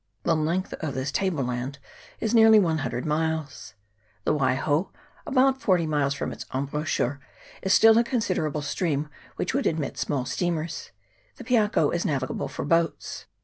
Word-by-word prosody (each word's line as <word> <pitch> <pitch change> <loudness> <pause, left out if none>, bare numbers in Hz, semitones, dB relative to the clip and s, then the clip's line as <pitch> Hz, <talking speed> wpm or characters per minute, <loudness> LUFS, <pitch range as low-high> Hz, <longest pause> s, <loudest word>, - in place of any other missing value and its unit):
The 165 - +2
length 165 +4 -1
of 150 -5 -4
this 130 +1 -2
table 175 -5 0
land 125 +3 -3 0.4
is 220 0 -1
nearly 225 -1 +7
one 165 -6 +2
hundred 130 -3 -3
miles. 155 -8 -2 0.5
The - - +2
Waiho 145 +4 +1 0.4
about 265 -1 +3
forty 180 -5 +2
miles 145 -3 0
from - - -3
its - - -7
embouchure 140 0 -1 0.4
is 190 - -1
still 225 0 +7
a - - +4
considerable 185 - -1
stream, 150 -1 -1 0.3
which - - -2
would 275 +2 +1
admit 155 -4 -2
small 135 -4 -1
steamers; 165 +3 -2 0.5
the - - -10
Piako 215 - +2
is 175 - 0
navigable 135 -4 -2
for - - -5
boats. 165 +2 0
155 Hz, 155 wpm, -26 LUFS, 140-190 Hz, 0.5 s, nearly